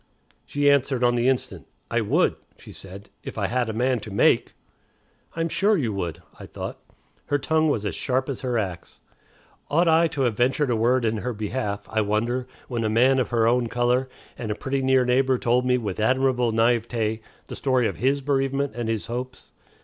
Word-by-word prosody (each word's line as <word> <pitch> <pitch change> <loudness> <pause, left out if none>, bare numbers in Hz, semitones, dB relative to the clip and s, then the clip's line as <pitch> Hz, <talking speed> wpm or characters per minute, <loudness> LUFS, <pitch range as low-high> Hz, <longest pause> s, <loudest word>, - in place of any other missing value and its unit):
She 145 0 0
answered 140 -2 +3
on 120 0 +4
the 120 +1 +2
instant. 130 -2 -2 0.2
"I - - +2
would," - - +2 0.2
she - - -13
said, 100 +1 -12
"if - - -8
I - - 0
had 125 -1 0
a - - 0
man 125 +3 0
to 105 - -9
make." 100 - +2 0.8
"I'm 165 0 0
sure 205 +5 +2
you 120 -9 -1
would," 85 -5 -4 0.2
I - - -9
thought. - - -7 0.5
Her 145 - +1
tongue 155 +2 +1
was 110 -7 -1
as 100 - -2
sharp 130 0 -1
as 140 -4 -4
her 125 -2 -1
axe. 95 -5 -5 0.7
Ought 170 +4 +3
I 165 +1 +5
to 155 -3 -4
have 120 -4 +1
ventured 130 +3 +1
a - - +2
word 120 +2 +2
in 110 0 0
her 125 +3 -3
behalf, 105 -1 -3
I 110 - 0
wonder, 115 +5 -1 0.2
when 120 -2 -2
a 110 - 0
man 130 +4 +4
of 125 - 0
her 115 -2 +2
own 120 0 +2
color, 125 +2 +1 0.3
and 115 - -4
a 105 - -1
pretty 135 +3 -2
near 130 -1 +3
neighbor, 130 +1 +2
told 125 +1 +1
me 125 0 +3
with 105 -6 -4
admirable 125 +1 +2
naïveté 115 -1 +1 0.2
the - - -8
story 130 -3 +1
of - - -5
his 140 +3 +1
bereavement 135 -1 0
and 120 -1 -3
his 110 -2 -2
hopes? 125 +2 -6
125 Hz, 205 wpm, -24 LUFS, 115-135 Hz, 0.8 s, I